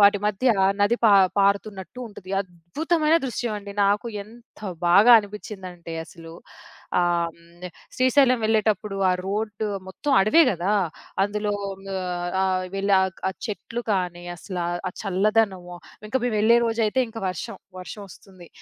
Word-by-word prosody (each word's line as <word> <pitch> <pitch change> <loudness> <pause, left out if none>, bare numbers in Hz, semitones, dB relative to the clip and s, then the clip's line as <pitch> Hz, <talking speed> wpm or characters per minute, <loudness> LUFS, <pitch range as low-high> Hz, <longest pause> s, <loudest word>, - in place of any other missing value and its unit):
వాటి 205 0 +6
మధ్య 210 +4 -1 0.3
నది 205 +4 +3
పా 220 - +7 0.3
పారుతున్నట్టు 200 0 0
ఉంటది. 190 -3 -12
అద్భుతమైన 300 - 0
దృశ్యం 240 -2 -3
అండి. 200 0 -9
నాకు 205 +3 +1 0.2
ఎంత 230 +3 -18 0.3
బాగా 205 +7 +7
అనిపించిందంటే 190 -5 -8
అసలు 165 0 -13 0.7
ఆహ్, 170 -1 0 0.6
శ్రీశైలం 255 0 +4
వెళ్ళేటప్పుడు 215 -2 +1
ఆ - - +3
రోడ్డు 210 +1 -2 0.2
మొత్తం 285 +10 -4
అడవే 215 +12 +5
గదా! 185 +2 -1 0.5
అందులో 210 +1 -1 0.4
ఆహ్, 180 -1 -3
ఆహ్ 185 -1 0
వెళ్ళి 200 +1 0
ఆక్ 190 -2 -3
ఆ - - 0 0.2
చెట్లు 230 +2 -5
కానీ 180 -2 -2
అసలా 180 -1 -5 0.2
ఆ - - -5
చల్లదనము 195 -2 0 0.3
ఇంకా 260 +5 +1
మేము 240 -3 0
వెళ్ళే 230 +3 +5
రోజైతే 225 +2 +1
ఇంకా 225 0 -8
వర్షం. 180 -2 -5 0.2
వర్షమోస్తుంది. 185 -2 -11
200 Hz, 130 wpm, -24 LUFS, 185-220 Hz, 0.7 s, పా